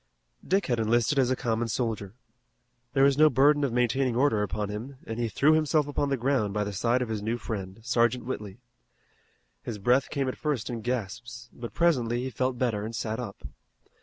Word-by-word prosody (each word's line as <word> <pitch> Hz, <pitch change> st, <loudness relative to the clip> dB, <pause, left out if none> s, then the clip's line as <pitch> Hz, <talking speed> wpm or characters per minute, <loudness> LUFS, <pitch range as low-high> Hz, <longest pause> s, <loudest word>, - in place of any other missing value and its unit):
Dick 195 Hz, +1 st, +1 dB
had 120 Hz, -5 st, 0 dB
enlisted 120 Hz, +6 st, +2 dB
as 130 Hz, -2 st, +3 dB
a 130 Hz, -, +2 dB
common 115 Hz, -2 st, -1 dB
soldier. 110 Hz, -3 st, -3 dB, 0.8 s
There 135 Hz, -1 st, +4 dB
was 140 Hz, +1 st, +4 dB
no 155 Hz, 0 st, +8 dB
burden 145 Hz, +1 st, +4 dB
of 140 Hz, -, +1 dB
maintaining 125 Hz, +1 st, +1 dB
order 125 Hz, -4 st, +3 dB
upon 105 Hz, 0 st, -2 dB
him, 120 Hz, +7 st, -6 dB
and 115 Hz, +1 st, -5 dB
he 120 Hz, -1 st, 0 dB
threw 150 Hz, +8 st, +4 dB
himself 155 Hz, -1 st, +2 dB
upon 145 Hz, 0 st, -1 dB
the 135 Hz, -, +1 dB
ground 120 Hz, -5 st, 0 dB
by 105 Hz, -, +1 dB
the 105 Hz, 0 st, -4 dB
side 120 Hz, +5 st, +1 dB
of 120 Hz, -, -6 dB
his 110 Hz, -2 st, -2 dB
new 115 Hz, +3 st, -1 dB
friend, 95 Hz, -5 st, -5 dB
Sergeant 120 Hz, 0 st, +1 dB
Whitley. 105 Hz, -6 st, -5 dB, 1.0 s
His 115 Hz, -, -5 dB
breath 125 Hz, +6 st, +2 dB
came 140 Hz, -3 st, -1 dB
at 130 Hz, -, -2 dB
first 145 Hz, -7 st, -2 dB
in 115 Hz, -2 st, -4 dB
gasps, 120 Hz, +1 st, -4 dB
but 120 Hz, -1 st, -8 dB
presently 125 Hz, -8 st, +2 dB
he 130 Hz, -, -4 dB
felt 130 Hz, 0 st, -1 dB
better 115 Hz, -5 st, 0 dB
and 115 Hz, +2 st, -5 dB
sat 110 Hz, 0 st, -3 dB
up. 110 Hz, -6 st, -7 dB
120 Hz, 200 wpm, -27 LUFS, 110-135 Hz, 1.0 s, no